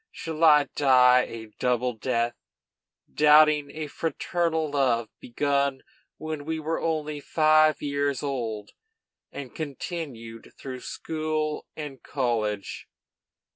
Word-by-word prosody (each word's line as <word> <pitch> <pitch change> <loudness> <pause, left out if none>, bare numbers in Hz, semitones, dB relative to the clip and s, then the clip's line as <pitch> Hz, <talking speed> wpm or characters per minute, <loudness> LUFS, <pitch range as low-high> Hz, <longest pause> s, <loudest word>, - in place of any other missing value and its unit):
Shall 160 0 -5
I 150 -2 +7
die 125 -2 +5
a 115 -1 -7
double 125 0 +1
death, 120 +1 -1 0.8
doubting 150 -1 +5
a 155 +2 -5
fraternal 160 0 -2
love 125 -5 +1
begun 140 +1 -1 0.3
when 155 -2 -5
we 160 +1 -3
were 160 +1 -2
only 155 -2 -2
five 155 +1 +3
years 140 -2 -1
old, 115 -7 -4 0.6
and 140 -3 -8
continued 140 - -7
through 130 -2 -7
school 155 +1 -3
and 145 -4 -7
college? 110 -7 -2
145 Hz, 105 wpm, -26 LUFS, 125-155 Hz, 0.8 s, I